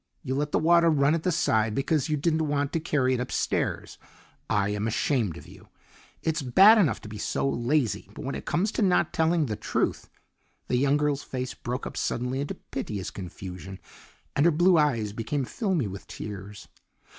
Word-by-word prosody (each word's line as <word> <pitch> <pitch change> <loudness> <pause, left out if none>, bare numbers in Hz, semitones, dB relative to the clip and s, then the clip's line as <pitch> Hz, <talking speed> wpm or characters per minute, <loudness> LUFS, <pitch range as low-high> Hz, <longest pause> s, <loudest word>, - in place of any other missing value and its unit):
You 130 -3 -2
let 145 +2 -1
the - - +2
water 170 +1 +5
run 145 -1 +3
at 165 - 0
the 180 - 0
side 110 -10 +1
because 145 +2 0
you 150 - +1
didn't 160 +1 +1
want 145 -1 -1
to 165 - +1
carry 140 -5 +1
it 125 - 0
upstairs. 125 - -2 0.5
I 100 -1 +1
am 105 +1 -1
ashamed 115 - 0
of - - -12
you. - - -15 0.6
It's 160 0 0
bad 195 - +7
enough 170 -9 +2
to - - -10
be 105 0 -8
so 135 - -1
lazy, 120 -4 0
but 150 - -7
when 135 - -3
it - - -6
comes 200 +5 +1
to - - -2
not 180 -4 +2
telling 160 0 +2
the 110 -5 -3
truth - - -2 0.3
" - - -43
The 125 - +2
young 140 +2 +3
girl's 150 -1 0
face 130 -1 -5
broke 125 +2 -5
up - - -6
suddenly 125 +3 -2
into 145 - -4
piteous 100 -3 -5
confusion, 95 0 -8 0.6
and 145 - +3
her - - +5
blue 175 +4 +4
eyes 115 -9 +1
became 130 +5 -2
filmy 190 - -1
with 100 0 -7
tears. 100 -1 -8
140 Hz, 195 wpm, -27 LUFS, 110-160 Hz, 0.6 s, bad